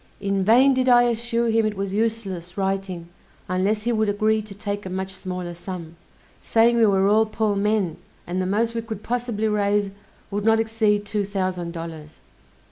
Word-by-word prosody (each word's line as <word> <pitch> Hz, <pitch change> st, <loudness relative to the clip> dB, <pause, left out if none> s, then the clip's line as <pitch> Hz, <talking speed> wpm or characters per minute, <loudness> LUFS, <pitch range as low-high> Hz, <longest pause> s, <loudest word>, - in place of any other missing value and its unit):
In 195 Hz, -1 st, 0 dB
vain 250 Hz, +7 st, +6 dB
did 255 Hz, 0 st, +1 dB
I 245 Hz, -1 st, +7 dB
assure 235 Hz, 0 st, 0 dB
him 225 Hz, 0 st, +3 dB
it 215 Hz, -2 st, -1 dB
was 195 Hz, -1 st, -3 dB
useless 200 Hz, -5 st, -2 dB
writing 190 Hz, -3 st, -2 dB, 0.4 s
unless 195 Hz, +4 st, 0 dB
he 240 Hz, -, 0 dB
would 220 Hz, -2 st, +1 dB
agree 215 Hz, +1 st, +1 dB
to 210 Hz, -1 st, -11 dB
take 205 Hz, 0 st, -4 dB
a 185 Hz, -, -6 dB
much 190 Hz, +1 st, -4 dB
smaller 180 Hz, -2 st, -5 dB
sum; 175 Hz, -2 st, -8 dB, 0.5 s
saying 230 Hz, +1 st, +3 dB
we 225 Hz, -2 st, +5 dB
were 195 Hz, -1 st, +3 dB
all 220 Hz, +2 st, +4 dB
poor 215 Hz, -1 st, 0 dB
men, 200 Hz, -4 st, 0 dB, 0.3 s
and 180 Hz, +2 st, -2 dB
the 185 Hz, -, -1 dB
most 225 Hz, +4 st, +1 dB
we 230 Hz, -, -2 dB
could 220 Hz, -2 st, -7 dB
possibly 235 Hz, -3 st, -1 dB
raise 205 Hz, -1 st, +1 dB, 0.4 s
would 205 Hz, +1 st, -2 dB
not 225 Hz, +1 st, +4 dB
exceed 220 Hz, -2 st, +1 dB
two 205 Hz, 0 st, -1 dB
thousand 185 Hz, -3 st, -3 dB
dollars. 160 Hz, -2 st, -8 dB
205 Hz, 185 wpm, -23 LUFS, 190-225 Hz, 0.5 s, I